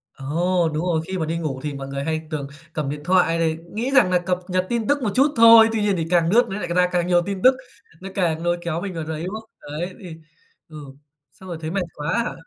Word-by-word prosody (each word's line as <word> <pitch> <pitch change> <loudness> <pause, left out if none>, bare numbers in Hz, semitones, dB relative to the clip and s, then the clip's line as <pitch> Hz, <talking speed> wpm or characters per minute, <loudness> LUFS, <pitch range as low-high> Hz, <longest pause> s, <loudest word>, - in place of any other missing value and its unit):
Ồ, 170 +5 0
đúng 155 +3 -2
rồi, 165 -3 +1
khi 190 0 -3
mà 160 - -1
đi 165 +2 -2
ngủ 150 -6 -3
thì 150 -1 -3
mọi 135 -1 -7
người 140 0 -4
hay 160 0 -3
tường 150 -3 -4 0.3
cầm 150 -4 -2
điện 145 +1 -5
thoại 180 -1 +3
này, 160 -1 0 0.2
nghĩ 235 +5 -2
rằng 270 -9 +5
nà 180 -1 +3
cập 180 0 -1
nhật 185 -1 0
tin 235 -2 -1
tức 285 0 +2
một 215 - +1
chút 280 +3 +3
thôi, 230 -1 +8
tuy 220 - 0
nhiên 205 -2 +1
thì 165 - -1
càng 170 -2 +3
lướt 240 +5 +4
nó 195 +1 -4
nại 180 - -4
ra 180 +1 +2
càng 175 -1 0
nhiều 175 -1 +4
tin 195 -1 -4
tức, 255 +1 +7 0.5
nó 195 - -7
càng 165 -4 0
nôi 175 0 +1
kéo 170 -1 -3
mình 195 0 -5
vào 165 -2 -4
đấy, 160 0 -5
đúng 190 +4 -5
không? 220 0 -9
Đấy, 160 +5 -5
thì 175 -5 -9 0.5
ừ, 155 - -11 0.5
xong 190 +4 -14
rồi 170 - -5
thấy 160 0 -4
mệt 195 +1 -1
quá 150 +2 -3
hả? 245 - -4
175 Hz, 270 wpm, -22 LUFS, 160-195 Hz, 0.5 s, thôi